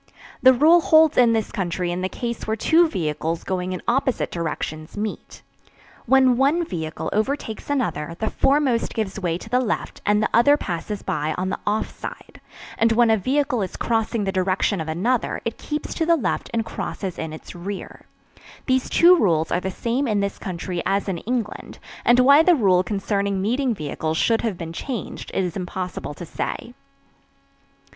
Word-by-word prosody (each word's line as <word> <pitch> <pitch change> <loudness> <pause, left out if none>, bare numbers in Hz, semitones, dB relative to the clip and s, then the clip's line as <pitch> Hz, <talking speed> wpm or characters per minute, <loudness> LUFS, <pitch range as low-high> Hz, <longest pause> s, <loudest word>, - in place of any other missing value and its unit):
The 260 - +8
rule 320 +7 +6
holds 315 -1 +5
in 240 -2 +5
this 220 -2 -1
country 175 -1 -2
in 180 +1 -3
the 185 - -1
case 235 +1 -5
where 220 - 0
two 325 +9 +4
vehicles 160 - -2
going 185 -1 -2
in 185 - -5
opposite 260 +1 0
directions 155 0 -4
meet. 210 0 -5 0.6
When 260 -1 +5
one 295 +6 +2
vehicle 160 - -4
overtakes 220 +1 -2
another 170 - -1
the 220 - -1
foremost 270 -4 +1
gives 210 -2 -2
way 170 -3 -1
to 185 - -11
the 250 +3 +2
left 245 -4 -3
and 210 0 +2
the - - +1
other 285 +6 +5
passes 195 - -4
by 155 +1 -2
on 185 +1 -1
the - - -3
"off 210 +1 -1
side"; - - -9 0.4
and 230 0 +4
when 235 0 +4
a - - +5
vehicle 260 +3 0
is 190 - -4
crossing 225 -1 0
the 195 - -1
direction 190 0 0
of 160 - -5
another 220 +10 0
it 230 - -4
keeps 300 0 -4
to 325 - -1
the 335 - +5
left 275 - -2
and 225 -1 -1
crosses 190 -4 -5
in 160 -1 -4
its 155 - -10
rear. 190 +3 -7 0.6
These 260 -1 +1
two 350 +2 +7
rules 165 - +1
are - - +2
the 190 - -2
same 240 +8 -1
in 210 -3 +1
this 200 0 -2
country 175 -1 -4
as 200 +1 0
in 185 -4 -2
England, 230 0 -4 0.3
and 240 +1 +5
why 280 +4 +7
the 350 +1 +5
rule 190 -9 +4
concerning 200 0 -1
meeting 240 +5 0
vehicles 155 0 -3
should 225 +5 +2
have 220 -6 -2
been 165 -1 -6
changed 245 +5 -5
it 190 - +1
is 180 -2 -3
impossible 180 -4 -5
to 175 - -8
say. 235 +8 -5
210 Hz, 185 wpm, -22 LUFS, 180-250 Hz, 0.6 s, The